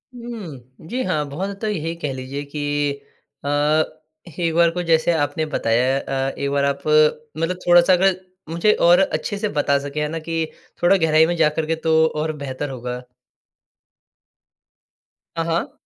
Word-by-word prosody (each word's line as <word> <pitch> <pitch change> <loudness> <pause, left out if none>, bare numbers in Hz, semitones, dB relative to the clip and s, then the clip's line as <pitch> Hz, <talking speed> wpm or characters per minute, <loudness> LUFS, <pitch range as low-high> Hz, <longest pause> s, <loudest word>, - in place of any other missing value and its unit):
हुँ। 165 - -9
जी 250 +6 -2
हाँ, 155 -7 -1
बहुत 185 +8 -3
हद 200 - -6
तक 220 - -1
यही 165 -2 -3
कह 150 -5 -4
लीजिए 130 +2 -5
कि 150 - -2 0.8
अ, 140 - -1 0.9
एक 165 -2 0
बार 170 0 +5
को 180 +1 -3
जैसे 165 +1 +3
आपने 145 0 0
बताया 125 +4 +2
अ, 135 0 -2
एक 140 0 -1
बार 140 0 +1
आप 140 0 -1 0.6
मतलब 165 +3 -1
थोड़ा-सा 175 +1 +6
अगर 185 0 +3 0.3
मुझे 170 +6 +3
और 175 +2 +6
अच्छे 200 +1 -1
से 210 0 -1
बता 145 -3 +1
सकें, 145 +2 -4
है 150 - 0
ना, 165 +1 -4
कि 165 0 -2 0.4
थोड़ा 185 +3 +5
गहराई 160 -2 +4
में 175 +1 -1
जाकर 155 0 +2
के, 165 +1 0
तो 160 0 +3
और 155 0 -2
बेहतर 135 +2 -4
होगा। 125 -1 -5 2.4
हाँ, 165 - +1
हाँ। 165 0 -1
160 Hz, 165 wpm, -21 LUFS, 140-175 Hz, 2.4 s, थोड़ा-सा